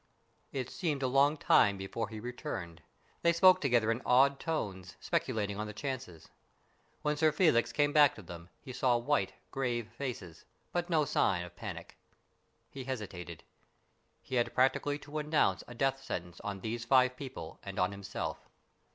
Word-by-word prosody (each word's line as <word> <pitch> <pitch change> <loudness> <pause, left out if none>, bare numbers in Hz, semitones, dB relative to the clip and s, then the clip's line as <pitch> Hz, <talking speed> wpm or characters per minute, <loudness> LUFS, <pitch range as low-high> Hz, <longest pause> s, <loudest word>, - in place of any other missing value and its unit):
It 130 -2 -4
seemed 150 -6 -2
a - - +2
long 140 +4 +4
time 100 -7 +4
before 95 +4 -4
he 110 -1 -7
returned. 95 -8 -6 0.4
They 170 - +4
spoke 185 +2 +6
together 120 -5 +3
in 115 +2 -2
awed 135 +2 +4
tones, 95 - -4
speculating 105 -2 -1
on 105 - -3
the 105 - -7
chances. 120 - -6 0.7
When 150 0 +1
Sir 155 0 +4
Felix 155 -7 +3
came 145 0 +2
back 145 -1 +6
to 110 - -11
them, 85 0 -10
he 130 - -8
saw 125 -1 +2
white, 120 -6 0 0.2
grave 120 -4 -2
faces, 115 - -5 0.3
but 175 +1 -2
no 155 -3 +3
sign 95 -9 +1
of 90 - -13
panic. - - -8 0.7
He 135 -2 -7
hesitated. 100 -9 -6 0.8
He - - -10
had 120 0 0
practically 135 +3 +2
to 145 0 -14
pronounce 150 -11 +1
a 120 - -10
death 135 +2 0
sentence 85 -2 -5
on 100 -2 -5
these 115 +2 -3
five 130 +1 +4
people 130 - -8
and 100 -1 -8
on 90 +1 +2
himself. 100 -1 -5
125 Hz, 165 wpm, -32 LUFS, 100-140 Hz, 0.8 s, spoke